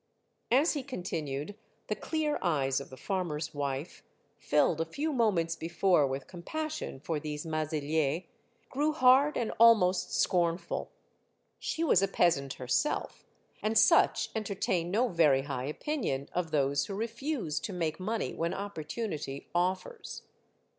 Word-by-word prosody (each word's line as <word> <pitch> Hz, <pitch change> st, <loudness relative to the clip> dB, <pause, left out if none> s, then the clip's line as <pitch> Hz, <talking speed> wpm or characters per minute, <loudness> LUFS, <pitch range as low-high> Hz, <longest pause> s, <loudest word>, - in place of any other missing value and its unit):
As 275 Hz, +8 st, +4 dB
he 290 Hz, -, -2 dB
continued, 170 Hz, -, -4 dB, 0.3 s
the -, -, -2 dB
clear 310 Hz, -2 st, -1 dB
eyes 140 Hz, -6 st, +1 dB
of -, -, -10 dB
the 130 Hz, -, -11 dB
farmer's 165 Hz, -5 st, -3 dB
wife, 140 Hz, +1 st, -4 dB, 0.4 s
filled 150 Hz, +2 st, +2 dB
a -, -, 0 dB
few 295 Hz, -, -2 dB
moments 185 Hz, -10 st, +1 dB
before 170 Hz, -2 st, +2 dB
with 135 Hz, +1 st, -4 dB
compassion 305 Hz, -, -5 dB
for 155 Hz, +2 st, -2 dB
these 150 Hz, 0 st, -5 dB
Maziliers, 155 Hz, 0 st, -1 dB, 0.4 s
grew 295 Hz, +3 st, 0 dB
hard 275 Hz, +1 st, +5 dB
and 235 Hz, -, -1 dB
almost 210 Hz, -6 st, +5 dB
scornful. 170 Hz, -1 st, 0 dB, 0.7 s
She 325 Hz, -, -2 dB
was 235 Hz, -, +4 dB
a 195 Hz, -, +3 dB
peasant 160 Hz, -8 st, +2 dB
herself, 130 Hz, -, -1 dB, 0.3 s
and 215 Hz, +1 st, +1 dB
such -, -, +4 dB
entertain 195 Hz, -5 st, -1 dB
no 225 Hz, +7 st, +2 dB
very 150 Hz, -, +3 dB
high 135 Hz, -3 st, -4 dB
opinion 150 Hz, -, -2 dB
of 175 Hz, -2 st, -1 dB
those 140 Hz, -1 st, +1 dB
who 195 Hz, -, -4 dB
refuse 230 Hz, -, -2 dB
to -, -, -5 dB
make 165 Hz, -3 st, -2 dB
money 220 Hz, +4 st, -2 dB
when 165 Hz, +1 st, -2 dB
opportunity 160 Hz, -6 st, -5 dB
offers. 185 Hz, -, -2 dB
175 Hz, 135 wpm, -30 LUFS, 150-225 Hz, 0.7 s, hard